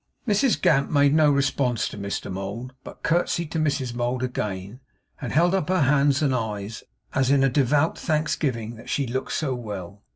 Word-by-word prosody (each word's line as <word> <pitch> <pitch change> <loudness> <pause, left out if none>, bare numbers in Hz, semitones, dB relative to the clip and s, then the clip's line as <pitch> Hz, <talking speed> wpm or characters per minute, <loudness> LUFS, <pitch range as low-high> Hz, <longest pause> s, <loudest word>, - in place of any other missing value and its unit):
Mrs 220 +4 +2
Gamp 140 -3 +3
made 140 -1 +4
no 155 -1 +5
response 135 -4 +1
to - - -9
Mr 100 -1 -4
Mould, 100 +7 -5
but - - -12
curtseyed 170 -1 0
to 165 - -1
Mrs 140 -5 0
Mould 120 +1 -1
again, 105 -3 -4 0.4
and 125 - -4
held 175 +5 +3
up 190 -4 0
her 185 -2 +2
hands 140 +1 +3
and 140 -3 +2
eyes, 110 -3 -3 0.3
as 135 -1 +2
in 140 -1 +4
a 135 - +4
devout 145 +4 +2
thanksgiving 140 -8 -1
that 115 - -12
she 140 - 0
looked 130 +2 -3
so 145 -5 -1
well. 100 -5 -7
135 Hz, 185 wpm, -24 LUFS, 115-150 Hz, 0.4 s, no